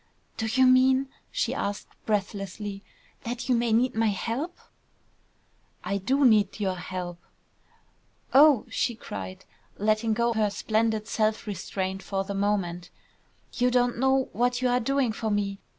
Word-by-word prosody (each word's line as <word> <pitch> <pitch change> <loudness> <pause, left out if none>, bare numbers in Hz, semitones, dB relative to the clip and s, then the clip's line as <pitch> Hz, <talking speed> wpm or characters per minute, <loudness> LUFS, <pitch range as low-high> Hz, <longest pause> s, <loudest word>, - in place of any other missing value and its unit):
"Do 220 - -2
you 260 +4 +3
mean," 260 +1 +4 0.2
she - - -1
asked, 200 0 -3 0.2
breathlessly, 200 -1 -3 0.4
"that 245 +1 -4
you 255 - +3
may 235 -1 +1
need 240 +3 +3
my 225 0 +1
help?" 235 - -2 1.3
"I 200 - -1
do 270 +8 +2
need 215 -4 +4
your 195 -2 0
help!" 175 -1 -5 1.1
"Oh!" 280 -4 +6
she 235 +1 0
cried, 95 - -8 0.3
letting 215 +2 +1
go 235 +1 +1
her 215 -2 +1
splendid 220 +1 0
self 215 -1 0
restraint 190 -1 -4
for 195 -1 -2
the 200 +1 -5
moment. 195 -3 -1 0.6
"You 250 0 +2
don't 245 -1 +1
know 265 0 +2
what 245 +1 +1
you 255 0 +1
are 245 0 +3
doing 270 0 +1
for 220 0 -3
me! 200 -1 -1
220 Hz, 145 wpm, -27 LUFS, 200-245 Hz, 1.3 s, Oh